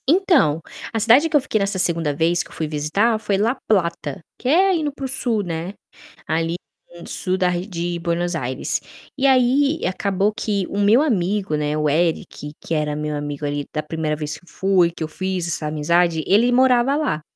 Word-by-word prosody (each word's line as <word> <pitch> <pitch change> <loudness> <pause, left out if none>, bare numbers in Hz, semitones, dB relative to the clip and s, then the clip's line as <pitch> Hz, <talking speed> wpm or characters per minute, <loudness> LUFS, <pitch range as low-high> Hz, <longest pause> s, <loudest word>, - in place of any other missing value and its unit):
Então, 300 - +3 0.3
a 225 - 0
cidade 245 +9 +5
que 305 - -2
eu 295 - +5
fiquei 220 - -1
nessa 200 -1 -1
segunda 165 -4 +1
vez 165 +3 +2
que - - -9
eu - - -14
fui 160 - -3
visitar 160 +10 0
foi 205 -2 0
La 225 +6 +1
Plata, 170 -8 0 0.2
que 250 - -5
é 375 +7 +4
indo 305 -3 -1
para 275 -1 -7
o - - -1
sul, 240 -4 -1
né, 170 +1 -4 0.5
ali 165 +1 0 0.5
sul 185 0 -2
da 185 -1 +2
ar 175 -1 -1
de 175 -2 -4
Buenos 170 +1 -1
Aires. 150 +2 -2 0.4
E 275 - 0
aí, 270 +4 +3
acabou 195 +2 0
que 205 -3 -1
o 200 - -3
meu 210 +6 +5
amigo 200 - 0
né, 150 0 -1
o 150 0 +1
Eric, 155 -1 -1
que - - -4
era 150 -1 0
meu 150 0 -3
amigo 145 0 -4
ali 145 0 -2
da 155 - -1
primeira 155 0 -2
vez 150 0 -5
fui, 185 -2 +2
que 165 - -6
eu - - -2
fiz 185 +2 -3
essa 155 -2 -2
amizade, 160 +2 +1
ele 230 +5 +4
morava 255 +1 +4
lá. 260 - -1
180 Hz, 195 wpm, -21 LUFS, 155-225 Hz, 0.5 s, cidade